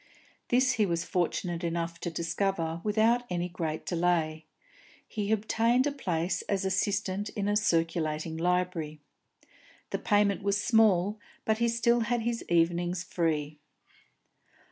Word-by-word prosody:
This 255 +1 +3
he 225 -4 +2
was 170 -1 -1
fortunate 175 -1 -1
enough 170 0 -2
to 175 - -3
discover 165 0 -2
without 220 +3 +3
any 175 0 -1
great 165 -3 -4
delay; 165 -3 0 0.6
he 210 -2 -3
obtained 230 +4 +2
a 290 - +1
place 180 - -1
as 195 -1 0
assistant 195 +1 0
in 205 -1 -3
a 205 - +1
circulating 165 -5 0
library. 175 -3 -1 0.9
The - - -1
payment 205 -2 +2
was 200 +1 +1
small, 210 -3 +3 0.3
but 220 0 +1
he 235 0 +2
still 235 +1 +2
had 235 +1 0
his 235 0 -2
evenings 175 +1 +1
free. 155 -4 -1
180 Hz, 130 wpm, -29 LUFS, 165-215 Hz, 0.9 s, This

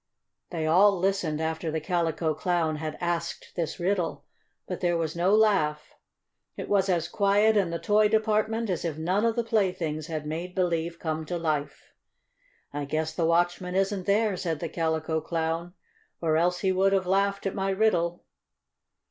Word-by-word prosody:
They 165 -3 -3
all 190 +5 +5
listened 180 -4 0
after 160 +1 -2
the 160 +1 -1
Calico 165 -1 0
Clown 160 -1 0
had 155 0 -5
asked 170 -1 -3
this 170 +1 -3
riddle. 180 0 -1 0.4
But - - -4
there 175 -2 +2
was 160 -1 -2
no 180 +4 +3
laugh. 185 -9 +2 0.6
It - - -5
was 195 -1 +2
as 170 -3 +1
quiet 205 +2 +3
in 195 -4 +2
the 170 - -2
toy 210 +3 +3
department 220 0 +1
as 180 - -2
if 160 -3 -3
none 185 +7 +1
of 230 -1 +1
the 235 - 0
playthings 180 -8 -1
had 155 -3 -4
made 170 +4 -5
believe 170 -2 0
come 160 -1 -3
to 175 - -2
life. 155 -3 -3 0.8
"I 145 0 -3
guess 155 +2 -2
the 165 -2 0
watchman 175 +2 +1
isn't 195 0 0
there," 205 0 +2
said 165 -4 -2
the 170 - -4
Calico 160 -1 -1
Clown, 165 +2 -3 0.4
"or 160 -2 +1
else 175 +2 +1
he 190 - +2
would 195 +1 +2
have 190 -1 +2
laughed 200 +2 +1
at 195 - -1
my 195 0 -1
riddle." 180 -4 +1
175 Hz, 175 wpm, -27 LUFS, 160-195 Hz, 0.8 s, all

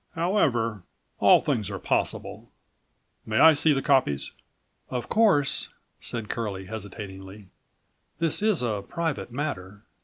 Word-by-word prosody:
"However, 130 - +1 0.4
all - - +6
things 105 -3 -1
are 100 - -4
possible. - - -2 0.7
May 110 0 -2
I 160 +5 +8
see 155 +1 +2
the 135 -2 +1
copies?" 75 - +2 0.6
"Of 125 -2 -4
course," 200 -11 +2 0.3
said 115 -3 -5
Curlie, 105 -5 -4
hesitatingly, 100 -2 -8 0.7
"this 165 +3 0
is 210 -10 +2
a 105 -4 -1
private 165 - -3
matter. 105 -8 -5
115 Hz, 120 wpm, -26 LUFS, 100-155 Hz, 0.7 s, I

